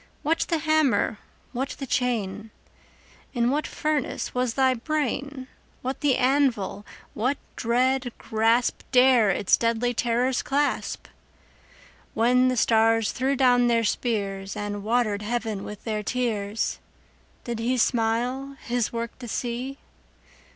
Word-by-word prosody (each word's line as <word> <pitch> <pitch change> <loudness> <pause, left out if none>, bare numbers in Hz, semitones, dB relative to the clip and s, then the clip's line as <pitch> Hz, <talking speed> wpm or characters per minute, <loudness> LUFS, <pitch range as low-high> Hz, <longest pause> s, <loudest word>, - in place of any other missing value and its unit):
What 325 +3 +1
the 335 - +2
hammer? 310 -8 +2 0.3
what 265 +2 -3
the 275 - -5
chain? 225 -5 -1 0.9
In 240 +1 +2
what 300 +2 -1
furnace 305 -4 -2
was 250 -2 -1
thy 265 -1 +4
brain? 280 0 -3 0.4
What 260 +2 -3
the 285 -3 +3
anvil? 255 -7 +1 0.3
What 255 +6 0 0.2
dread 250 +2 +1
grasp 225 +2 +1
15 - - -35
Dare 250 -4 +5
its 195 +1 +3
deadly 235 +1 0
terrors 245 +2 +1
clasp? 285 +1 -1 1.1
When 250 +3 +4
the 255 -1 0
stars 225 -1 +3
threw 265 +2 0
down 245 -2 +4
their 230 -1 +2
spears, 200 -4 -2
And 205 -1 -4
water'd 215 -2 +1
heaven 220 -2 -3
with 210 -1 -8
their 215 -2 -2
tears, 215 -3 -2 0.6
Did 235 -2 -4
He 245 +3 0
smile 245 +4 0
His 240 -2 -1
work 235 +1 -5
to 245 - -7
see? 245 +4 -3
245 Hz, 130 wpm, -25 LUFS, 225-260 Hz, 1.1 s, Dare